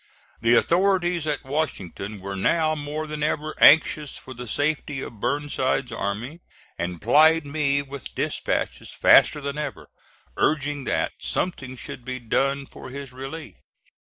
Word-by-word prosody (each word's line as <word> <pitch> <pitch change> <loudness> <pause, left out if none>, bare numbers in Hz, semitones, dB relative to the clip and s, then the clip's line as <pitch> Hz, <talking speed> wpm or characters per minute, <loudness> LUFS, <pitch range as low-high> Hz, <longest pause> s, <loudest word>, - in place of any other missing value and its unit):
The 115 +1 +5
authorities 175 +1 +2
at 150 - -1
Washington 105 - -3
were 100 +1 -5
now 155 - +2
more 150 +1 -4
than 150 0 -6
ever 155 0 -1
anxious 150 -1 +5
for 130 - -10
the 125 0 -8
safety 145 +2 -1
of 115 -4 -8
Burnside's 130 0 -1
army, 115 +8 -4 0.4
and 85 0 -4
plied 155 +7 +5
me 140 -1 0
with 140 -1 -9
dispatches - - -2
faster 150 - +5
than 140 +1 -4
ever, 145 -3 -5 0.5
urging 145 -2 0
that - - 0
something 135 -8 -3
should 125 - -8
be 130 0 -4
done 135 +3 0
for - - -11
his 140 0 -7
relief. 135 +5 -8
140 Hz, 140 wpm, -24 LUFS, 125-155 Hz, 0.5 s, The